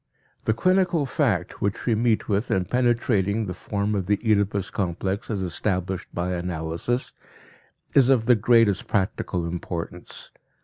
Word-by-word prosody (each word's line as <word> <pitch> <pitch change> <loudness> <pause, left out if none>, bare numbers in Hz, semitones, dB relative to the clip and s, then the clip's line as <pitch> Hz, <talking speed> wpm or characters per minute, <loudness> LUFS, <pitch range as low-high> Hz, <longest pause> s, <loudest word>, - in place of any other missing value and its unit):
The 110 - +2
clinical 180 0 +2
fact 110 - -1
which 100 0 -1
we 120 - +2
meet 110 0 +1
with 105 +2 0
in 95 -1 +1
penetrating 115 -2 +1
the 90 - -4
form 100 +2 -2
of 95 -3 -1
the 105 0 +3
Oedipus 100 -3 +1
complex 95 +1 -2
as 100 -4 -2
established 95 +1 -2
by 90 +1 -2
analysis, 85 +7 -2 0.8
is 135 -2 +5
of 125 -4 +4
the 125 - +6
greatest 115 -2 +3
practical 95 -4 -1
importance. 85 0 -6
100 Hz, 140 wpm, -24 LUFS, 90-115 Hz, 0.8 s, the